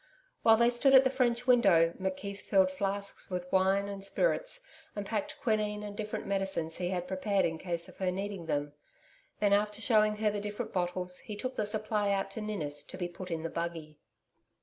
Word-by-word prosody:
While 225 0 +6
they 235 +1 +4
stood 270 +3 +4
at 265 - +9
the 260 - +2
French 245 -2 +1
window, 195 -10 +5
McKeith 195 +1 -3
filled 190 -2 +3
flasks 200 +1 -2
with 180 -1 -3
wine 190 +1 +3
and 200 -1 -6
spirits, - - 0 0.3
and 205 -1 -4
packed 295 +9 -3
quinine 210 -3 0
and 205 -1 -6
different 215 0 -4
medicines 195 -5 -1
he 175 -1 -2
had 180 -1 -2
prepared 195 +1 +1
in 160 -1 -2
case 170 -2 -2
of - - -14
her 190 -1 0
needing 195 -2 -4
them. 145 -1 -1 0.7
Then 205 -1 +3
after 210 +1 +1
shewing 215 -2 +3
her 210 0 +1
the 205 - -3
different 205 0 -5
bottles, 180 0 -1
he 215 -5 -7
took 255 +5 -4
the 210 - -1
supply 210 -1 0
out 195 0 -1
to 220 - -5
Ninnis 155 -9 -3
to - - -9
be 175 -2 -2
put 180 +1 -9
in 165 -2 -3
the 165 - -2
buggy. 165 -3 -5
200 Hz, 200 wpm, -31 LUFS, 180-215 Hz, 0.7 s, at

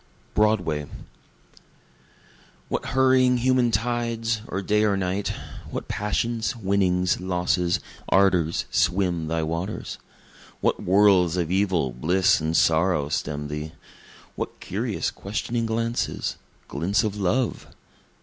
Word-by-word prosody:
Broadway 90 -9 +1 1.8
What - - -2
hurrying 130 -1 +4
human 125 0 +3
tides, 115 -1 -1
or 95 +2 -3
day 105 +2 +2
or 100 -2 +2
night! 95 +1 -1 0.4
What - - -5
passions, 115 +3 -1
winnings, 95 -4 +1
losses, 90 -1 0 0.3
ardors, 90 -4 +3
swim 90 -3 +1
thy 80 0 -1
waters! 85 +6 -4 0.6
What - - +1
whirls 95 -2 +4
of 85 -1 -1
evil, 95 -8 +1
bliss 85 +9 +2
and 80 +1 0
sorrow, 80 -3 +2
stem 75 -1 -2
thee! 75 +1 -5 0.6
What - - -5
curious - - -2
questioning 115 +3 -3
glances 115 +1 -2 0.3
glints 90 +9 0
of 105 -2 -2
love! 105 +5 -1
95 Hz, 110 wpm, -24 LUFS, 85-110 Hz, 1.8 s, hurrying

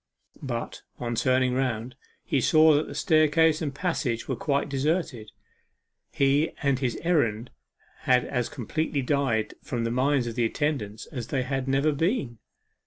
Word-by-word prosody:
But, 120 -4 -5 0.2
on 120 -1 -3
turning 130 +1 +2
round, 125 -2 -2 0.3
he 135 - 0
saw 155 +4 +5
that 150 +1 +1
the - - -8
staircase 155 +2 +3
and 150 -3 -2
passage 140 -6 -2
were 130 - -1
quite 140 +4 -1
deserted. 140 -5 -1 0.8
He 140 +3 +2
and 140 -2 +2
his 125 -3 -1
errand 120 -10 +1 0.5
had 125 -1 +2
as 125 -3 -2
completely 145 +3 -2
died 130 -5 0
from 120 -3 -3
the 115 - -1
minds 130 +1 +1
of 120 - -4
the 120 0 0
attendants 115 -6 -2
as 125 -6 -5
if - - -20
they 130 -3 0
had 135 0 -3
never 135 +3 +2
been. 145 - -1
135 Hz, 160 wpm, -26 LUFS, 120-150 Hz, 0.8 s, saw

